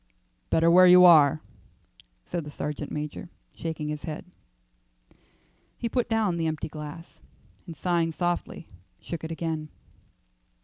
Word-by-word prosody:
"Better 165 +1 +3
where 185 +1 +7
you 180 0 +8
are," 155 -3 +6 0.8
said 175 -2 -4
the 150 - -9
sergeant 150 0 -5
major, 150 +3 -5 0.2
shaking 160 -2 -5
his 150 -1 -4
head. 155 +2 -6 1.5
He 235 - -3
put 245 0 -1
down 215 -6 +1
the 165 -1 -1
empty 155 0 -3
glass, 150 +2 -10 0.5
and 165 - -9
sighing 170 -2 0
softly, 175 0 -3 0.3
shook 170 -2 -7
it 160 - -5
again. 160 -2 -4
165 Hz, 130 wpm, -26 LUFS, 150-175 Hz, 1.5 s, you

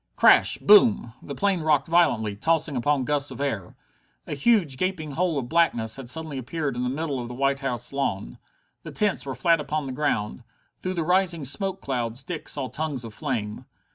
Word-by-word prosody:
Crash! - - +5
Boom! 205 - +5
The 140 - -7
plane 195 +1 0
rocked 150 -3 +2
violently, 110 -12 +2
tossing 160 +5 +1
upon 135 +2 +1
gusts 145 +1 +1
of - - -9
air. 110 -10 -3 0.5
A - - -5
huge, 155 - +2
gaping 175 -4 -2
hole 170 +1 0
of 130 -3 -3
blackness 120 -9 +1
had 135 -3 -6
suddenly 155 -1 -1
appeared 140 +1 -3
in 125 - -3
the 125 - -1
middle 140 0 -3
of 120 - -5
the 120 - -8
White 140 +1 0
House 125 -2 -3
lawn. 95 - -3 0.4
The - - -9
tents 205 -8 -1
were 135 - -4
flat 170 -2 +2
upon 150 0 -3
the 135 - -5
ground. 125 -5 -2 0.4
Through 185 0 -3
the 170 - -1
rising 180 -3 +1
smoke 190 +8 0
clouds 120 -1 -2
Dick 170 0 -5
saw 135 -3 0
tongues 145 -3 -4
of 115 -2 -9
flame. 115 -8 -4
140 Hz, 195 wpm, -25 LUFS, 125-165 Hz, 0.5 s, Crash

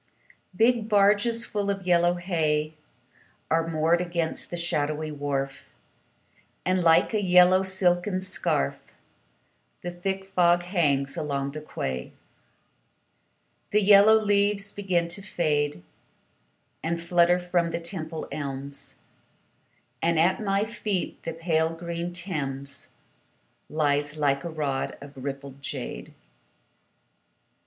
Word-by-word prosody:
Big 225 +1 +2
barges 210 +3 +3
full 205 -2 -2
of 195 -2 -2
yellow 175 0 +3
hay 155 -4 0 0.8
Are 165 0 +2
moored 165 +2 +2
against 170 -2 -2
the 175 - -4
shadowy 155 -2 -1
wharf, 140 -2 -3 1.0
And, 185 0 +2
like 165 +6 +4
a 215 - +1
yellow 180 0 +6
silken 185 0 +2
scarf, 185 - -1 1.0
The 175 - -3
thick 190 +2 -4
fog 175 -2 +3
hangs 145 -7 +1
along 140 -2 -2
the 155 +1 -7
quay. 65 - -5 1.6
The 210 - +3
yellow 205 +2 +7
leaves 205 -1 +1
begin 185 -4 0
to 175 +4 -3
fade 150 - -1 1.0
And 170 +1 -2
flutter 175 +1 +3
from 175 -1 0
the 165 0 -3
Temple 165 -2 -4
elms, 140 -1 -5 1.1
And 165 -1 +2
at 180 +6 +3
my 200 0 +1
feet 210 -5 -3
the 165 - -5
pale 160 -1 +1
green 170 +1 -4
Thames 140 -6 -4 0.8
Lies 145 -1 0
like 140 -2 +1
a 170 - -4
rod 145 -4 -2
of 140 0 -12
rippled 140 0 -6
jade. - - -6
170 Hz, 115 wpm, -26 LUFS, 150-190 Hz, 1.6 s, yellow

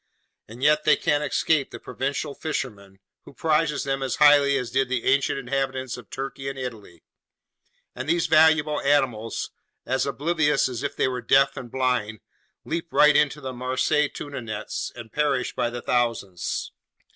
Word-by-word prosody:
And 120 +4 -10
yet 150 +1 +4
they 150 - +5
can't 150 -2 0
escape 150 -1 +1
the 120 - -9
Provençal 140 +4 -4
fishermen, 105 -11 -5 0.3
who - - -14
prize 150 0 +1
them 135 0 -2
as 130 -3 -1
highly 145 -2 +5
as 125 -3 -4
did 135 0 +1
the 130 -2 -1
ancient 140 +1 +2
inhabitants 130 -1 -2
of 125 -4 -12
Turkey 135 0 -5
and 135 - -7
Italy; 110 -10 -8 0.9
and - - -6
these 170 0 +2
valuable 155 -1 +4
animals, 130 -6 0 0.3
as 130 +2 0
oblivious 150 +3 +1
as 125 -3 -5
if 140 - -3
they - - +1
were 125 -1 -3
deaf 135 +3 +3
and 120 - -7
blind, 125 -5 -1 0.4
leap 165 +1 -3
right 150 0 +5
into 150 0 +2
the 130 -1 -5
Marseilles 130 +4 0
tuna 145 -3 -6
nets 110 -2 -5
and 115 -2 -10
perish 145 -4 0
by 120 - -1
the 120 0 -7
thousands. 115 -8 -1
135 Hz, 165 wpm, -24 LUFS, 120-150 Hz, 0.9 s, they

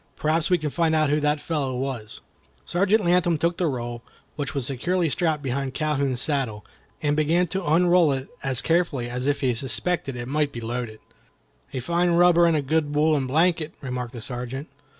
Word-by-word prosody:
Perhaps 155 +2 0
we 180 - +4
can 155 -3 -3
find 165 0 +1
out 155 -2 +2
who 150 - +2
the 150 0 +1
fellow 145 -4 -2
was." 125 -5 -5 0.4
Sergeant 195 +4 +2
Latham 175 -1 +3
took 170 +3 0
the 175 - +2
roll, 120 -3 -4 0.3
which 145 -1 -4
was 135 -3 -1
securely 165 +6 -1
strapped 155 -2 0
behind 135 0 -3
Calhoun's 140 -5 0
saddle, 130 -8 -1 0.4
and 145 0 +2
began 160 +4 +2
to 190 +3 -4
unroll 175 0 +4
it 135 0 -3
as 130 -2 +1
carefully 165 -7 +1
as 125 +2 -3
if 145 0 0
he 130 -3 +2
suspected 135 +4 0
it 120 0 -5
might 145 +1 0
be 120 - -6
loaded. 115 -1 -5 0.7
"A 130 - -4
fine 170 +5 +1
rubber 175 0 +5
and 165 -2 +3
a 145 - -1
good 150 +1 0
woollen 150 -3 +2
blanket," 160 +2 +1
remarked 125 -2 -5
the 120 -3 -8
Sergeant. 125 +3 -5
150 Hz, 190 wpm, -24 LUFS, 130-170 Hz, 0.7 s, rubber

